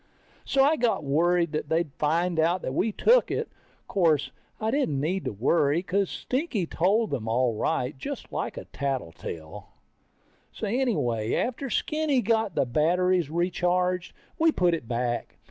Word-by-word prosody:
So 270 -1 +3
I 305 +3 +4
got 235 -8 +1
worried 170 +4 +2
that 155 - -3
they'd 160 -3 0
find 165 +2 0
out 170 +3 +2
that 130 - -3
we 215 +10 +1
took - - +4
it. 460 - -2 0.4
Course, 160 -7 +2 0.3
I 220 0 0
didn't 230 - 0
need 175 +6 -1
to - - -1
worry, 140 +8 +2
because 190 +2 0
Stinky 255 - -2
told 200 +8 +1
them 120 -6 -3
all 120 +1 +2
right, 125 +5 -1
just 130 - -7
like - - -3
a - - -6
tattletale. 85 - -5 0.8
So - - -5
anyway, 200 - 0
after 255 +2 -2
Skinny 305 +1 +1
got 220 -3 +1
the - - +2
batteries 175 +5 +2
recharged, 180 +1 0 0.3
we 325 0 +5
put 180 - +2
it 160 -9 -3
back. 120 0 -2
175 Hz, 155 wpm, -26 LUFS, 140-215 Hz, 0.8 s, we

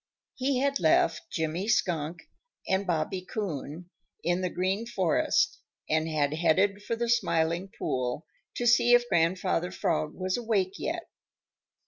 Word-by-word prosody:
He 265 0 0
had 280 +2 +1
left 160 0 +2
Jimmy 160 +5 -2
Skunk 170 -6 0 0.4
and 190 +1 0
Bobby 175 +2 -1
Coon 175 - -5 0.3
in 175 +1 +1
the 180 - 0
Green 190 +6 -1
Forest 190 -8 +1 0.3
and 160 +1 +1
had 150 -2 0
headed 185 +5 +2
for 230 - -2
the 235 +1 -2
Smiling 175 -5 +1
Pool 125 +4 -2 0.3
to 240 - -2
see 240 0 +6
if 240 0 +2
Grandfather 175 0 +1
Frog 155 -4 -1
was 185 +2 -1
awake 205 -5 -1
yet. 335 +1 -3
185 Hz, 135 wpm, -28 LUFS, 160-220 Hz, 0.4 s, see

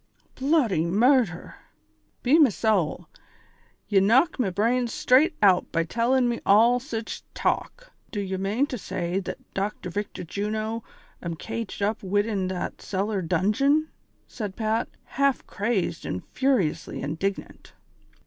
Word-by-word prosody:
" - - -38
Bloody 265 - +2
murdlier! 210 +1 +2 0.7
be 280 +6 +5
me 295 -5 +7
sowl, 205 -6 0 0.8
ye 200 -2 +4
knock 245 - +3
me 230 -6 +2
branes 230 +6 +1
strait 290 +9 +3
out 185 -3 +4
by 165 - +1
tellin' 240 +8 +1
me 240 -1 -1
all 230 +5 +5
sich 230 -4 -5
talk! - - -2 0.2
Do 205 - -4
ye 190 -1 -2
mane 205 +8 +1
to 255 -4 -5
say 185 -1 -2
that 195 - -5 0.2
Dr. 195 -2 -3
Victor 205 0 -4
Juno 215 +5 -3 0.4
am 170 -1 -4
caged 225 +3 -5
up 210 +2 0
widin 205 0 0
that 185 -1 -4
cellar 200 +1 -2
dungon 210 - +2
V - - -19 0.2
" - - -41
said 205 -4 -6
Pat, 220 0 -1
half 275 0 0
crazed 200 -5 -1
and 90 - -4
furiously 255 - 0
indignant. 165 +8 -4
210 Hz, 140 wpm, -25 LUFS, 190-245 Hz, 0.8 s, me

